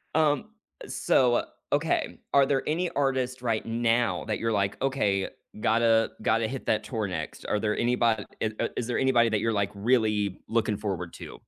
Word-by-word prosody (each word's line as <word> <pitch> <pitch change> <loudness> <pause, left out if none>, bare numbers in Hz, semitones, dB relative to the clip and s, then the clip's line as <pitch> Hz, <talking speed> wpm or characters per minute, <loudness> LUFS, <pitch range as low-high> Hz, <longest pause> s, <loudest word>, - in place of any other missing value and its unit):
Um, 155 +4 +3 0.4
uh, - - -9
so, 125 -8 +2 0.3
okay. 145 +2 0
Are 140 -1 +6
there 135 -1 +1
any 170 +3 0
artists 130 -2 -1
right 115 -3 -1
now 115 +1 +1
that 110 - -1
you're 115 0 0
like, 100 -2 0
"Okay, 105 -8 +1 0.3
gotta 115 0 +3
gotta 110 +1 +2
hit 135 +1 -6
that 110 0 +1
tour 110 -5 -2
next." 80 -4 -5
Are 105 - +1
there 105 0 0
anybod 120 -3 +1 0.2
eh 110 - +1
uh, 115 - +1
is 120 - -2
there 120 - -1
anybody 120 -3 +4
that 110 -2 +1
you're, 115 +1 0
like, 100 -1 0
really 105 -3 +1
looking 110 -3 0
forward 95 -5 -4
to? - - -9
115 Hz, 185 wpm, -27 LUFS, 105-130 Hz, 0.4 s, Are